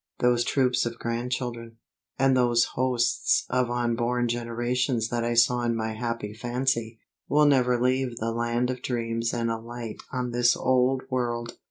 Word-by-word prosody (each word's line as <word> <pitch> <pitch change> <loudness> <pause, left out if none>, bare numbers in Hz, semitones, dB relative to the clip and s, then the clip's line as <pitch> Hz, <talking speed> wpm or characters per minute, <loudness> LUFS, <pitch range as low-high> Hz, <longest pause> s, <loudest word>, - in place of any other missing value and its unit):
Those 120 -1 +2
troops 125 -2 +1
of 115 0 -6
grandchildren, 120 -1 -4 0.4
and 135 0 +3
those 120 -2 +3
hosts 125 -1 +1
of 125 -1 +1
unborn 120 0 0
generations 120 0 -1
that 120 -1 -1
I 120 0 0
saw 120 +1 +4
in 120 -1 0
my 110 0 -2
happy 115 -2 -4
fancy, 120 0 -1 0.3
will 150 +1 +4
never 125 -4 +3
leave 125 -1 0
the 115 0 -2
land 120 +2 0
of 125 -1 -6
dreams 115 -1 -2
and 115 -1 -1
alight 115 0 -6
on 125 -2 -2
this 120 0 +3
old 130 0 +2
world. 120 -2 -2
120 Hz, 155 wpm, -26 LUFS, 115-125 Hz, 0.4 s, saw